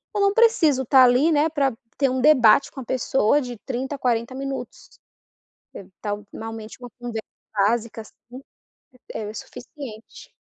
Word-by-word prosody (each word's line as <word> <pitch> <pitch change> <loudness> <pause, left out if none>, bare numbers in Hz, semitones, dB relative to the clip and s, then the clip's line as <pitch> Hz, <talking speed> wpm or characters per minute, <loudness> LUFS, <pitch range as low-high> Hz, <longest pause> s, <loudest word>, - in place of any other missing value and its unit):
eu - - 0
não 395 0 +3
preciso 335 - +3
tá 260 +1 +6
ali, 255 +6 +4
né, 300 +1 +3
para 280 -5 0 0.2
ter 275 -2 +2
um 255 0 -1
debate 265 -4 +5
com 270 - -10
a - - -10
pessoa 260 +2 +1
de 245 -2 -6
30, 265 +3 -4
40 240 -1 -1
minutos. 275 0 -7 0.8
Evitar 200 +2 -6
um 205 0 -10
finalmente 225 0 -8
uma 245 - -8
conversa 235 -2 -6 0.3
básica 220 +2 0
assim 245 +4 -14 0.7
é - - -4
é 210 - -5
o 215 - -10
suficiente. 245 -2 -10
250 Hz, 160 wpm, -23 LUFS, 225-275 Hz, 0.8 s, tá